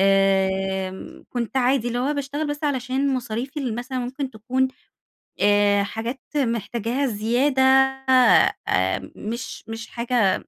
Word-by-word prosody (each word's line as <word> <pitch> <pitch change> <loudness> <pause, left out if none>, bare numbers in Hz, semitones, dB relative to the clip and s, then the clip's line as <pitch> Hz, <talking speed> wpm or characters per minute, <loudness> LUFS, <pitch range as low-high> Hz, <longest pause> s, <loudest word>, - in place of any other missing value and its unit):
آمم، 190 -1 +1
كنت 245 +1 -3
عادي 250 -1 +2
اللي 240 0 -2
هو 275 +4 0
باشتغل 285 +2 -3
بس 290 +1 -4
علشان 265 0 0
مصاريفي 250 +4 -4
ال 245 -5 -2
مثلًا 255 +2 -4
ممكن 260 +2 -4
تكون 255 +4 -1 0.7
آآ 205 0 +4
حاجات 230 +6 -5 0.2
محتاجاها 235 +1 -1
زيادة 245 +5 +1
آآ 265 - +3
مش 230 +3 -6
مش 225 0 -6
حاجة 235 -4 +1
245 Hz, 120 wpm, -23 LUFS, 215-265 Hz, 0.7 s, آآ